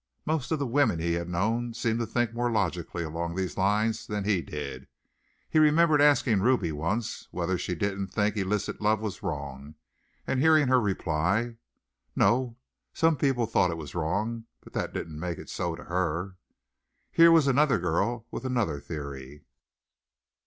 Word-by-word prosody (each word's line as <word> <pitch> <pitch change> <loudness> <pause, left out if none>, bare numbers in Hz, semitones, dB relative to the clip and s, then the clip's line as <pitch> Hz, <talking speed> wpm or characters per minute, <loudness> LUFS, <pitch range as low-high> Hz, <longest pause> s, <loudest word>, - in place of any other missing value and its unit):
Most 155 -3 -1
of 160 - +2
the 140 - -1
women 120 - +2
he 85 +1 -1
had 85 +1 -3
known 115 +7 -1
seemed 115 0 0
to 115 - -2
think 120 0 0
more 120 +1 0
logically 85 -5 -1
along 85 +2 -4
these 95 -2 -2
lines 105 +3 +1
than 105 -1 -2
he 100 -3 +1
did. 70 -4 -7 0.6
He 155 - +2
remembered 155 0 +5
asking 130 -8 +4
Ruby 110 -7 +2
once 85 +10 -3
whether 90 +1 -1
she 90 0 -3
didn't 100 +2 -2
think 105 +2 0
illicit 105 +1 -2
love 105 0 +2
was 105 -5 -5
wrong 70 -4 -5 0.5
and 135 - 0
hearing 155 -2 +5
her 130 -1 +5
reply, 100 +4 0 0.6
"No. 120 -1 +2 0.4
Some 165 -1 +3
people 135 -4 +1
thought 90 - +2
it 85 - -3
was 75 -3 -8
wrong, 105 +8 -2 0.2
but - - -16
that - - -2
didn't 75 -2 -6
make 85 0 -3
it - - -9
so 85 -2 -2
to - - -11
her." 90 +1 -2 0.8
Here 165 0 +7
was 165 -3 +6
another 140 +1 +3
girl 100 +7 -1
with - - -5
another 120 - -1
theory. 70 -2 -8
100 Hz, 165 wpm, -28 LUFS, 85-120 Hz, 0.8 s, Here